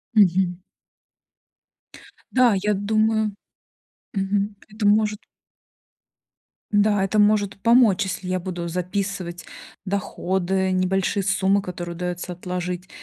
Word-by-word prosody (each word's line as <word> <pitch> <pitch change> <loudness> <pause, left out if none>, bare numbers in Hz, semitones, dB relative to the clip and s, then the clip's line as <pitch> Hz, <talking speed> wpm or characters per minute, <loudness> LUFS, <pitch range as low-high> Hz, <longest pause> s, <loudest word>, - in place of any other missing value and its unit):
Мгм. 185 -2 +3 1.7
Да, 250 -4 +4
я 210 +2 +1
думаю, 215 +1 +1 0.8
мгм, 200 +1 -1
это 210 -1 -2
может 210 0 +3 1.5
Да, 205 -1 +3
это 210 +2 +1
может 205 -1 +2
помочь, 230 -4 +5
если 185 -1 -5
я 185 0 0
буду 175 -1 -5
записывать 180 0 -3 0.4
доходы, 190 -1 -1
небольшие 190 +2 +1
суммы, 195 +1 +2
которые 175 -2 -6
удаётся 180 +1 -4
отложить. 180 +1 -5
195 Hz, 95 wpm, -23 LUFS, 180-205 Hz, 1.7 s, помочь